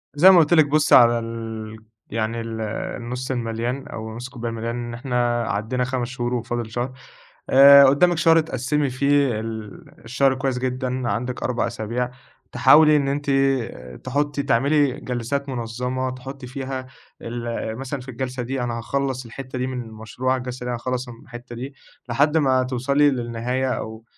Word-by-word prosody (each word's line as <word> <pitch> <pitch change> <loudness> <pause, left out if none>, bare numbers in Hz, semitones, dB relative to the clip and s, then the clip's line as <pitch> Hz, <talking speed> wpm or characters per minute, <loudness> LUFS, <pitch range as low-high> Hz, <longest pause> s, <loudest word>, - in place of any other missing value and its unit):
زي 180 +6 +8
ما 180 - +7
قلت 160 +1 +3
لِك 155 -3 +6
بُصّي 150 +1 +4
على 120 -1 +6
ال 115 -1 -6 0.3
يعني 115 +1 -2
ال 115 -1 -5 0.4
النص 125 +2 -4
المليان 120 +2 -3
أو 110 0 -7
نص 120 +2 -6
الكوباية 120 -3 -5
المليان، 115 +1 -4
إن 120 -1 -5
إحنا 120 -1 0
عدينا 115 +5 -1
5 125 -1 -2
شهور 125 -1 -3
وفاضل 120 -1 -3
شهر. 120 +2 -2 0.6
آآ 140 +1 +9
قدّامك 165 +6 +4
شهر 165 0 +5
تقسمي 145 -1 -1
فيه 140 -3 +2
ال 110 -2 -7 0.2
الشهر 135 +2 +2
كويّس 130 -1 -1
جدًا 130 -1 -2
عندك 125 +2 -3
4 125 -2 0
أسابيع، 120 +3 -3 0.4
تحاولي 150 +5 +6
إن 140 -1 +1
أنتِ 145 0 -2 0.7
تحطّي 145 +2 -1
تعملي 140 +1 +2
جلسات 130 +3 -3
منظمة 125 +1 -3
تحطّي 130 +1 -8
فيها 130 0 -5 0.4
ال 115 -1 -4
مثلًا 135 +1 -4
في 125 - -13
الجلسة 125 +1 -4
دي 130 +2 -3
أنا 120 -1 -2
هاخلّص 130 +1 -2
الحتّة 130 +2 -7
دي 130 - -1
من 130 -1 -4
المشروع، 115 +4 -3
الجلسة 125 0 -6
دي 125 - -2
هاخلص 125 +1 -3
م - - -7
الحتّة 120 0 -10
دي، 135 +3 -7 0.3
لحد 145 +6 +2
ما 130 -4 +3
توصلي 140 +3 +2
للنهاية، 125 +1 -2
أو 110 -2 -5
125 Hz, 160 wpm, -22 LUFS, 120-135 Hz, 0.7 s, آآ